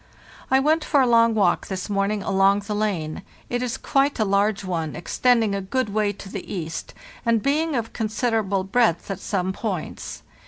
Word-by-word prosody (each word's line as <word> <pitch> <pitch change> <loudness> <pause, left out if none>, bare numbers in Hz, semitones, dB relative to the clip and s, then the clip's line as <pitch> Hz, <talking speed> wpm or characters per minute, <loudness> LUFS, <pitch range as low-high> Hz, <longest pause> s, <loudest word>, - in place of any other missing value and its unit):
I 265 - +5
went 310 +3 +2
for 285 - +2
a 265 - +5
long 230 -1 +4
walk 210 - +2
this 190 -1 -4
morning 200 0 0
along 195 +1 +3
the 205 +1 -4
lane; 195 -8 -2 0.3
it 245 0 0
is 250 -2 -2
quite 275 +1 +1
a 215 - +2
large 200 +1 +1
one, 165 -4 -2
extending 225 +3 +2
a 200 - -1
good 220 +5 -1
way 210 0 +1
to 200 0 -10
the 195 -1 -7
east, 165 -4 -5 0.3
and 230 -2 +2
being 305 +2 +1
of 225 -2 -2
con 225 - -1
siderable 215 -3 0
breadth 210 -7 +2
at 195 - -4
some 190 -1 -1
points. 190 -6 -5
210 Hz, 190 wpm, -23 LUFS, 195-235 Hz, 0.3 s, I